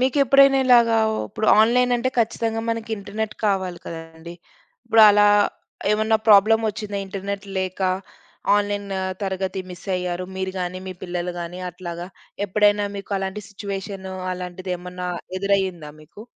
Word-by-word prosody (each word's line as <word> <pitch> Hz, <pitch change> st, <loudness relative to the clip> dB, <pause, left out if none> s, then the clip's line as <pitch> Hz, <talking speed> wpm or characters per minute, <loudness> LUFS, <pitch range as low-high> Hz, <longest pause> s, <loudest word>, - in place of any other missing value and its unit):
మీకెప్పుడైనా 275 Hz, +1 st, +5 dB
ఇలాగా 235 Hz, -2 st, +6 dB, 0.3 s
ఉప్పుడు 215 Hz, +2 st, -3 dB
ఆన్‌లైన్ 245 Hz, +3 st, +3 dB
అంటే, 240 Hz, +2 st, 0 dB
ఖచ్చితంగా 225 Hz, 0 st, 0 dB
మనకి 230 Hz, 0 st, -3 dB
ఇంటర్‌నెట్ 210 Hz, +2 st, -4 dB
కావాలి 190 Hz, -3 st, -1 dB
కదండీ! 165 Hz, +1 st, -9 dB, 0.5 s
ఇప్పుడు 225 Hz, -1 st, +6 dB
అలా 205 Hz, 0 st, +6 dB, 0.7 s
ఏమన్నా 220 Hz, +1 st, +2 dB
ప్రాబ్లమొచ్చిందా? 215 Hz, 0 st, +4 dB
ఇంటర్‌నెట్ 195 Hz, +1 st, -5 dB
లేక, 185 Hz, 0 st, -3 dB, 0.8 s
ఆన్‌లైన్ 205 Hz, 0 st, -1 dB, 0.3 s
తరగతి 190 Hz, -1 st, -2 dB
మిస్ 180 Hz, +1 st, -11 dB
అయ్యారు. 180 Hz, 0 st, -3 dB
మీరు 190 Hz, 0 st, -3 dB
గాని, 180 Hz, +1 st, -4 dB
మీ 185 Hz, -, -6 dB
పిల్లలు 180 Hz, -1 st, -3 dB
గాని 175 Hz, +2 st, -6 dB
అట్లాగా, 175 Hz, 0 st, -7 dB, 0.4 s
ఎప్పుడైనా 205 Hz, +1 st, +3 dB
మీకు 200 Hz, +1 st, -7 dB
అలాంటి 195 Hz, +2 st, -4 dB
సిచ్యుయేషను, 195 Hz, -1 st, -6 dB, 0.2 s
అలాంటిదేమన్నా 180 Hz, 0 st, -5 dB, 0.3 s
ఎదురయ్యిందా 190 Hz, -5 st, 0 dB
మీకు? 165 Hz, +8 st, -13 dB
195 Hz, 120 wpm, -22 LUFS, 180-220 Hz, 0.8 s, ఇలాగా